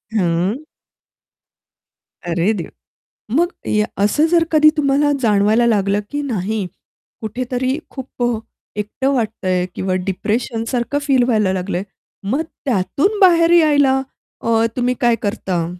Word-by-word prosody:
हां. 180 +4 0 1.7
अरे 170 +4 +1
देवा! 180 -5 -5 0.7
मग 340 +4 +3 0.2
या 210 0 +2 0.2
असं 295 +9 +3
जर 340 -1 +4
कधी 305 -1 +6
तुम्हाला 290 0 +2
जाणवायला 215 +1 +3
लागलं, 200 -2 +1
की 290 0 -2
नाही 215 -6 -2 0.6
कुठेतरी 255 +4 -2
खूप 260 -2 -6
अ, 240 -1 +1 0.4
एकटं 215 +6 -1
वाटतंय 200 -7 -1
किंवा 185 0 -2
डिप्रेशनसारखं 230 +6 -2
फील 270 -3 +2
व्हायला 215 -6 +1
लागलंय, 185 0 -2 0.5
मग 270 +8 +1 0.2
त्यातून 280 - 0
बाहेर 340 -3 +5
यायला 285 -5 +4 0.4
अ, 230 0 +1 0.2
तुम्ही 250 0 +1
काय 240 -1 +4
करता? 190 -5 -2
235 Hz, 120 wpm, -18 LUFS, 200-275 Hz, 1.7 s, कधी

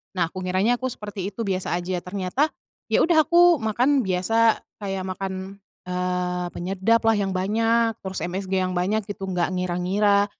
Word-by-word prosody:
Nah, 175 - +2
aku 185 - -6
ngiranya 185 +6 +2
aku 260 0 -2
seperti 205 -4 -5
itu 230 +3 -5
biasa 185 -2 -1
aja, 180 0 -3
ternyata 195 - -1 0.4
ya - - +4
udah 325 -2 +5
aku 345 -5 +5
makan 250 +6 +2
biasa 225 +3 +2 0.2
kayak 195 -2 -3
makan, 190 +1 -5 0.2
eee, 180 0 -2
penyedaplah 195 +6 +1
yang 200 -2 0
banyak, 225 +4 +2
terus 190 -1 -4
MSG 190 +2 -4
yang 185 0 0
banyak 195 +4 0
gitu 195 -1 -6
nggak 180 -1 0
ngira-ngira, 185 +3 +2
195 Hz, 155 wpm, -24 LUFS, 185-225 Hz, 0.4 s, udah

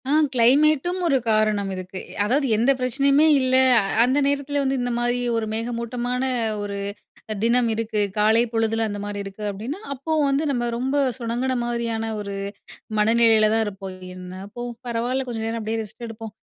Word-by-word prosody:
ஆ - - +1 0.2
கிளைமேட்டும் 300 +8 +3
ஒரு 275 -4 +3
காரணம் 215 -2 +1
இருக்கு. 185 0 -6 0.3
அதாவது 270 +6 +1
எந்த 235 +5 +3
பிரச்சனையுமே 275 +4 +3
இல்ல, 260 0 +2 0.5
அந்த 255 +3 +2
நேரத்தில 285 0 0
வந்து 270 0 0
இந்த 245 0 -1
மாதிரி 240 +1 +1 0.2
ஒரு 225 - -1
மேகமூட்டமான 240 +2 -2 0.4
ஒரு 200 -1 -4 0.7
தினம் 235 +1 +3
இருக்கு, 220 -1 -2 0.2
காலை 220 +2 +4
பொழுதில 225 0 +1
அந்த 205 -1 -4
மாரி 205 0 -5
இருக்கு. 195 +2 -9
அப்படின்னா, 230 - -5
அப்போ 280 +5 -5 0.2
வந்து 275 +3 +1
நம்ம 245 -3 0
ரொம்ப 260 +4 -1 0.2
சுனங்குன 245 +2 -1
மாரியான 235 -2 -2 0.2
ஒரு 200 -1 -5 0.6
மனநிலையில 220 0 +4
தான் 225 0 +2
இருப்போம். 195 -2 -7 0.2
என்ன 180 0 -9 0.2
போ, 240 - -5 0.2
பரவாயில்ல 245 +3 -1
கொஞ்ச 230 -2 -4
நேரம் 225 0 -2
அப்படியே 220 +1 -2
ரெஸ்ட் 220 +3 -9
எடுப்போம். 225 -1 -8
235 Hz, 155 wpm, -23 LUFS, 215-260 Hz, 0.7 s, காலை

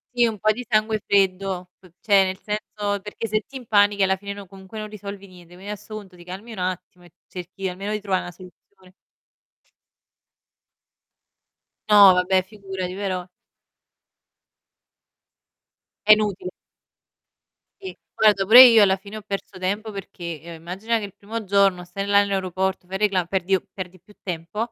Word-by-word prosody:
Sì 240 -1 +4
un 220 -3 -2
po' 215 0 +3
di 245 +3 -6
sangue 215 -1 +1
freddo, 190 -2 +1 0.3
cioè, 200 -3 +4
nel 190 0 -3
senso 210 -1 -3
perché 210 +3 -6
se 215 +1 0
ti 270 - -8
impanichi, 205 -4 +2
alla 190 0 +3
fine, 200 +1 -7
no 200 -2 -10
comunque 195 +3 -11
non 215 0 -6
risolvi 200 -1 -9
niente, 175 -1 -16
quindi 195 +3 -8
adesso 210 +1 -9
punto 195 -4 -10
ti 175 - -14
calmi 190 +6 -9
un 220 - -9
attimo, 180 -1 -5
e 175 - -18 0.2
cerchi 185 +1 -6
almeno 195 +3 -5
di 215 -1 -2
trovà 190 -2 0
'na 175 - -8
soluzione. 185 +1 -18 3.0
No, 200 -3 +9
vabbè, 185 +1 +2
figurati, 190 -2 -6
però 185 -2 -3 2.8
È 215 - +7
inutile. 205 -4 -1 1.3
Sì, 380 - -8 0.2
guarda, 210 -2 +4
pure 240 +6 +10
io 230 -4 +8
alla 190 -1 +3
fine 200 +2 -11
ho 215 - -6
perso 200 -1 -6
tempo 200 +4 -2
perché, 170 -5 -7
ehm, 170 0 -9
immagina, 190 +8 -2
che 205 - -5
il 195 - -11
primo 220 +1 -6
giorno 195 -2 +2
stai 195 +3 -5
là 200 0 +5
nell'aeroporto, 190 -1 -1
fai 190 - -6
il - - -13
recla 190 -3 +2
perdi 190 +1 +1 0.2
perdi 185 -2 -8
più 210 - -20
tempo. 190 +6 -4
195 Hz, 160 wpm, -23 LUFS, 185-210 Hz, 3.0 s, pure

